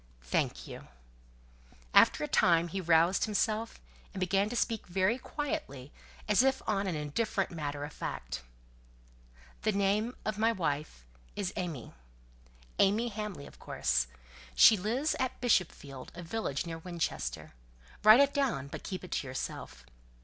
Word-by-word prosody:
"Thank - - -1
you." - - -9 1.1
After - - +6
a - - -1
time 170 0 +3
he 190 +3 -3
roused 170 +2 +4
himself, 220 +1 -1 0.4
and - - -3
began 195 +3 +1
to 245 - -4
speak 225 -2 -1
very 190 +7 +1
quietly, 280 - -4 0.4
as 210 +2 +5
if 265 0 +2
on 200 -2 0
an 180 - -1
indifferent 185 +7 -1
matter 145 -3 -4
of 145 +1 -6
fact. - - -5 1.2
"The 215 - +2
name 205 +4 +1
of 215 -1 -2
my 225 +1 +4
wife 150 - -3 0.3
is 195 -2 -2
AimÄe. 165 -10 -5 0.9
AimÄe 220 +5 +3
Hamley, 210 -8 -5
of - - -14
course. 65 - 0 0.5
She 220 - +8
lives 235 +10 0
at 260 0 -2
Bishopsfield, 155 - 0
a 175 - -7
village 170 -5 -2
near 165 -1 -5
Winchester. 170 -1 -4 0.5
Write 215 +5 +9
it 280 0 +3
down, 240 - 0
but - - -7
keep 185 -1 -5
it 180 - -10
to 140 - -2
yourself. 65 - -6
190 Hz, 145 wpm, -31 LUFS, 150-220 Hz, 1.2 s, Write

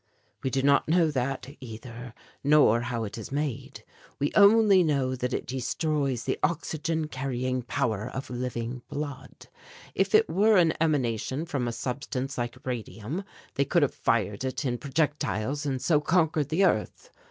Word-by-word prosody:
"We 130 - -1
do 135 +1 0
not 140 0 +4
know 165 -1 +4
that 130 -1 -2
either, 120 0 -9 0.3
nor 140 -6 +5
how 120 -1 -3
it 110 +1 -6
is 110 - -8
made. 140 -2 -3 0.3
We 145 +1 0
only 205 -2 +6
know 135 -5 +1
that 125 0 -2
it - - -2
destroys 135 0 -1
the - - -2
oxygen 160 -1 -1
carrying 130 -2 -2
power 115 -4 -1
of 135 - -6
living 120 0 -4
blood. 145 -2 -6 0.5
If - - +2
it 440 +1 +5
were 210 +2 +4
an 170 -3 +4
emanation 135 -1 0
from 140 -8 -2
a - - -1
substance 130 +3 -4
like 120 -1 -3
radium, 125 - -4 0.3
they 140 - +1
could 165 +3 +3
have 140 - +1
fired 105 -1 0
it 130 +2 -3
in 120 -2 -1
projectiles 145 - -1
and 135 -2 -1
so 150 +2 +2
conquered 160 -3 +1
the 175 +5 +3
earth. - - -1
135 Hz, 160 wpm, -27 LUFS, 125-155 Hz, 0.5 s, only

